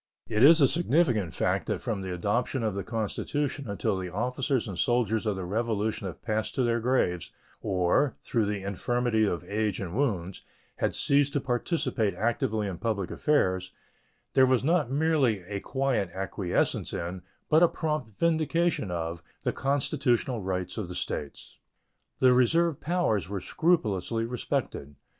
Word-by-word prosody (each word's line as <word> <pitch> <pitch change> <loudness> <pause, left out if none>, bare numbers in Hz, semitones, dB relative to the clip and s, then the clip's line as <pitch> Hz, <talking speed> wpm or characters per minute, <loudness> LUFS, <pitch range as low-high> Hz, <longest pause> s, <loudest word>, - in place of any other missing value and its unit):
It 110 -1 0
is 160 +5 +8
a 140 - +6
significant 130 - +2
fact - - 0
that - - -1
from 105 -4 -3
the 95 -1 -5
adoption 110 +8 -1
of 110 -2 0
the 100 0 -3
Constitution 125 +5 -3
until 100 -1 -1
the 90 -1 -4
officers 125 +5 -1
and 100 - -5
soldiers 110 +1 +1
of 105 - +1
the 95 -1 -4
Revolution 110 0 -1
had 90 - -9
passed 110 -1 -2
to 130 - +2
their 120 -1 +1
graves, 110 -8 0 0.3
or, 95 +9 +1
through 110 -3 0
the 100 -2 -3
infirmities 110 +3 0
of 85 - -2
age 105 -1 -1
and 90 -2 -5
wounds, 100 -10 -1 0.4
had - - 0
ceased 140 0 +2
to 145 - +2
participate 125 - -1
actively 110 0 0
in 95 -4 -5
public 105 -5 -2
affairs, 95 -11 +1 0.6
there 130 -1 +6
was 130 -2 +2
not 160 -2 +2
merely 135 - +2
a 100 +2 -4
quiet 130 -6 -1
acquiescence 95 -1 -1
in, 90 +2 -4 0.3
but 155 +2 +4
a 175 - +7
prompt 155 -7 -2
vindication 165 - +1
of, 85 -1 -3 0.2
the - - 0
constitutional 135 -3 0
rights 95 +1 -3
of 100 - -3
the 90 - -7
States. 75 -4 -5 0.6
The 130 -1 +5
reserved 160 +5 +3
powers 150 - 0
were 100 -1 -3
scrupulously 115 - 0
respected. 110 - -3
115 Hz, 155 wpm, -28 LUFS, 95-135 Hz, 0.6 s, is